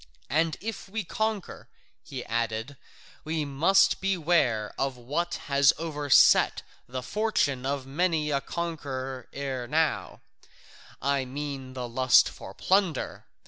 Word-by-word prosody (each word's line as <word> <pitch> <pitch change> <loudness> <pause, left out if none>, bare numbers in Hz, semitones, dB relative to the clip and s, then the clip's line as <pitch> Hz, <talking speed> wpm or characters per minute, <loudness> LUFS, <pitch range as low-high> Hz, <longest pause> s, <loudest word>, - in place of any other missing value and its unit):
And 160 +2 +1
if 220 -1 -6
we 220 +2 -3
conquer," 215 +1 -3 0.3
he 130 -2 -7
added, 115 +3 -2 0.5
"we 155 -1 -2
must 155 +8 +3
beware 165 - +1
of 135 -2 -2
what 150 +8 -2
has 140 0 +4
overset 150 -4 +4 0.3
the 130 0 -4
fortune 140 - 0
of 140 -1 -2
many 155 +1 0
a 140 -1 +1
conqueror 135 -7 -4
ere 135 -3 -4
now, 155 +3 0 0.8
I 140 -1 +1
mean 135 -1 -6
the 125 -1 -4
lust 130 +2 +5
for - - -11
plunder. 185 -7 0
140 Hz, 120 wpm, -27 LUFS, 130-170 Hz, 0.8 s, lust